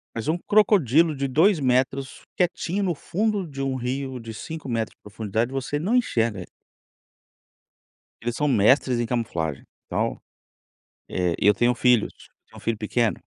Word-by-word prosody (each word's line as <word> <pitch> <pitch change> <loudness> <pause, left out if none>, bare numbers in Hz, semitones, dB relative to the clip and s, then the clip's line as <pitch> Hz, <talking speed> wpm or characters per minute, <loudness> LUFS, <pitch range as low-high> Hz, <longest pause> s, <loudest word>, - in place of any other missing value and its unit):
Mas 115 - -4
um 160 +3 +1
crocodilo 170 - +3
de 140 0 -1
2 165 +7 +4
metros 130 +1 0
quietinho 180 +2 0
no 175 -4 0
fundo 205 +4 -1
de 140 -2 -7
um 135 -1 -1
rio 130 +1 -3
de 115 -1 -8
5 155 +5 -7
metros 115 -2 -2
de - - -64
profundidade 110 +3 -2
você 135 +2 -2
não 205 +10 0
enxerga 115 - +1
ele. 90 - -8 1.7
Eles 120 0 -3
são 150 - 0
mestres 125 +1 +3
em 120 - 0
camuflagem, 85 - -2 0.2
então, - - -2 0.9
eh, 90 -2 0
e - - +3
eu 105 - +7
tenho 120 +1 +3
filhos, 125 -2 +3 0.3
eu - - -66
tenho - - -14
um - - -9
filho 115 -2 -2
pequeno. 110 -1 0
130 Hz, 165 wpm, -24 LUFS, 115-155 Hz, 1.7 s, eu